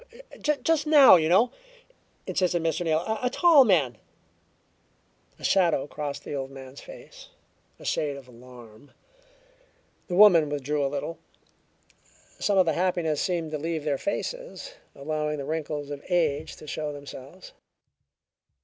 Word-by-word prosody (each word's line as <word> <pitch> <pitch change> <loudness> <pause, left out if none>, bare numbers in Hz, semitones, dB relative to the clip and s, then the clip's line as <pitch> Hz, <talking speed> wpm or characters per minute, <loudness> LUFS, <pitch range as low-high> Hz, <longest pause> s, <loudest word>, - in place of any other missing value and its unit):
"Just 300 +1 0
now, 290 -7 +8
you 160 -2 +2
know," 220 +8 +4 0.7
insisted 175 -2 0
Mr. 165 +1 -1
Neal. 170 +7 -1
"A 250 - +1
tall 320 0 +6
man 150 - +1 0.7
" - - -40
A - - -15
shadow 175 -7 +2
crossed 145 -1 -6
the - - -7
old 135 -1 -4
man's 135 0 -11
face - - -13 0.5
a - - -14
shade 145 -2 -1
of 135 -2 -13
alarm. 120 0 -15 1.1
The 175 - -3
woman 180 -7 +7
withdrew 145 0 -2
a 135 - 0
little. 145 +4 -5 1.2
Some 200 -1 +1
of 185 - +5
the 160 - +1
happiness 170 -3 0
seemed 170 -4 -2
to 155 - -3
leave 160 0 -3
their 145 -3 -1
faces, - - -5 0.2
allowing 150 +1 -3
the 140 - -5
wrinkles 150 -1 -4
of 145 0 -7
age 160 -4 0
to - - -13
show 150 0 -4
themselves. 145 +4 -11
155 Hz, 140 wpm, -26 LUFS, 140-180 Hz, 1.2 s, now